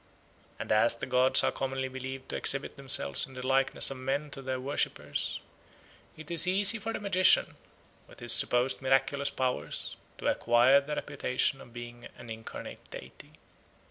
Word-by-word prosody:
And - - -6
as 110 +2 +3
the - - -5
gods 130 0 +4
are - - +2
commonly 135 0 -3
believed 130 0 -8
to - - -3
exhibit 140 0 -1
themselves 130 - +2
in 130 - -14
the 125 0 -6
likeness 135 +1 +3
of 135 - -6
men 140 +3 -3
to 135 - -8
their 130 -1 -4
worshippers, 135 +3 -3 0.8
it 160 +1 -11
is 170 +1 +3
easy 200 +4 +2
for 225 - -4
the - - -4
magician, 185 -2 +4 0.5
with - - -17
his 120 -1 +1
supposed 125 +3 +2
miraculous 135 +1 +1
powers, 130 -2 -3 0.2
to - - -9
acquire 120 +4 +4
the 150 +2 -5
reputation 130 +2 -2
of 120 - -14
being 120 0 -10
an 120 -2 -11
incarnate 110 0 -8
deity. - - -12
130 Hz, 165 wpm, -29 LUFS, 125-140 Hz, 0.8 s, gods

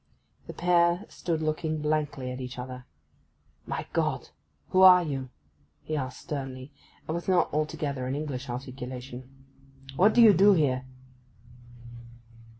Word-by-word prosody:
The - - -7
pair 175 +2 +2
stood 160 -2 -3
looking 155 0 -1
blankly 150 -4 -2
at 125 +1 -6
each 125 0 -7
other. 125 0 -7 0.8
'My - - -3
Gott, - - -1 0.4
who 185 - +3
are 180 -1 +9
you?' 135 -5 -4 0.5
he 155 - -3
asked 130 -5 -4
sternly, 135 -3 -6 0.4
and 155 - -2
with 170 +1 -4
not 180 -2 +2
altogether 145 -3 -2
an 130 - -2
English 140 -3 -5
articulation. 125 0 -7 0.7
'What 205 +6 +4
do 240 - +7
you 215 -2 +8
do 200 +3 +6
here? 130 -7 +1
145 Hz, 135 wpm, -27 LUFS, 130-170 Hz, 0.8 s, are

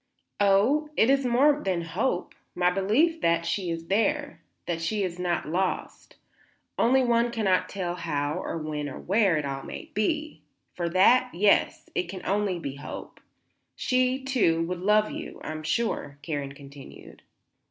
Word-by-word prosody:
"Oh, 210 +10 +3
it 230 - +5
is 275 -2 +2
more 280 +5 +4
than 180 -3 -1
hope, 180 +4 -2 0.2
my 180 0 +3
belief 245 - +2
that 170 0 +2
she 180 +1 -1
is 165 0 -4
there; 290 - 0 0.2
that 165 -1 -3
she 205 +5 -1
is 180 -1 -4
not 175 -3 -1
lost. 180 +4 -3 0.6
Only 260 +3 +3
one 235 -1 +2
cannot 210 -6 +1
tell 180 -3 -3
how 155 -2 -2
or - - -3
when 150 -2 -4
or 130 - -8
where 195 -3 +2
it 150 - -2
all 135 -1 -4
may - - -9
be. 300 - -1 0.3
For 170 -1 -2
that, 240 +8 +5
yes, 200 +3 +2
it 180 -1 -2
can 185 0 -6
be - - -15
only 185 -8 -1
hope. 145 - -8 0.6
She, 255 +1 +1
too, 210 -12 +2
would 175 +1 -3
love 210 +3 +3
you, - - -7
I - - -4
am 155 0 -5
sure," 155 -5 -2
Karen 145 -3 -4
continued. 140 -1 -13
185 Hz, 165 wpm, -27 LUFS, 165-235 Hz, 0.6 s, it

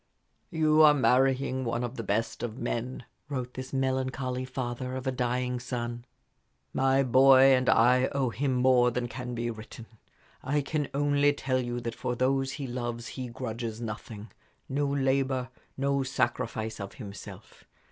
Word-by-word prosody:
"You 155 -3 +3
are 150 -1 +8
marrying 130 0 +2
one 120 0 -1
of 120 +1 -4
the 115 - -4
best 110 +2 -1
of 120 -1 -4
men," 125 +1 -3 0.2
wrote 125 -3 -4
this 130 0 -7
melancholy 130 -1 -1
father 125 0 -4
of 130 0 -5
a 130 - +1
dying 125 0 -1
son. 120 -1 -4 0.7
"My 135 +1 +3
boy 135 +1 +7
and 130 0 +2
I 125 +3 +5
owe 135 -3 -1
him 135 +2 -1
more 125 -1 +4
than 120 0 -2
can 125 +1 -6
be 120 0 -2
written. 110 +1 -10 0.6
I 145 +3 +1
can 145 0 -2
only 145 0 +3
tell 130 -2 -1
you 120 0 -3
that 115 -1 -4
for 125 - -3
those 135 +2 +1
he 140 - -5
loves 120 -2 -4
he 130 +2 -5
grudges 115 -2 -5
nothing 110 -2 -7 0.4
no 145 +2 0
labor, 135 -2 0 0.3
no 140 0 +1
sacrifice 115 -4 -2
of 100 0 -6
himself. 100 -5 -10
130 Hz, 155 wpm, -28 LUFS, 120-135 Hz, 0.7 s, are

